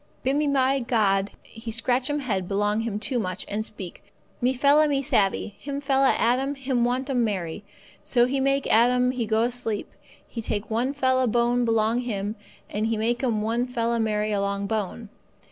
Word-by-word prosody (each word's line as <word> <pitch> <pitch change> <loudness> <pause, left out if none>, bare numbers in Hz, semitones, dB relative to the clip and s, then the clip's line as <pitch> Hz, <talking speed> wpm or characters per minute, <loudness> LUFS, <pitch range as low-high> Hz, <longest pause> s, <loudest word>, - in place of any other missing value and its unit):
"Bimeby 270 -2 +1
God 200 -4 +2
He 225 +1 -10
scratch 245 +4 0
'm 290 0 -1
head 195 -8 -2
belong 205 +2 +1
Him 225 -2 -2
too 245 +2 -1
much, 185 -2 -3
and 210 +1 -2
speak: 195 -5 -8 0.4
'Me 250 +1 +3
fella 285 +4 +4
me 280 -2 +1
savvee, 205 -3 +1
him 280 0 -4
fella 270 -1 +3
Adam 260 +4 +1
him 265 -3 0
want 250 +2 0
'm 255 -4 +1
Mary.' 190 -4 -3 0.4
So 240 -2 +2
He 270 +2 -1
make 275 +1 +1
Adam 250 +2 +4
he 245 -3 -3
go 220 +1 +2
asleep, 240 -3 -3 0.4
He 230 - -6
take 210 0 -3
one 240 +4 +1
fella 260 -2 +2
bone 240 +1 +2
belong 225 +1 +2
him, 210 -4 -3 0.3
and 215 +2 -2
He 225 -1 0
make 240 +4 0
'm 220 -4 0
one 235 +3 0
fella 235 -1 -1
Mary 215 -1 0
along 200 0 -1
bone. 215 +1 -3
235 Hz, 180 wpm, -25 LUFS, 215-260 Hz, 0.4 s, fella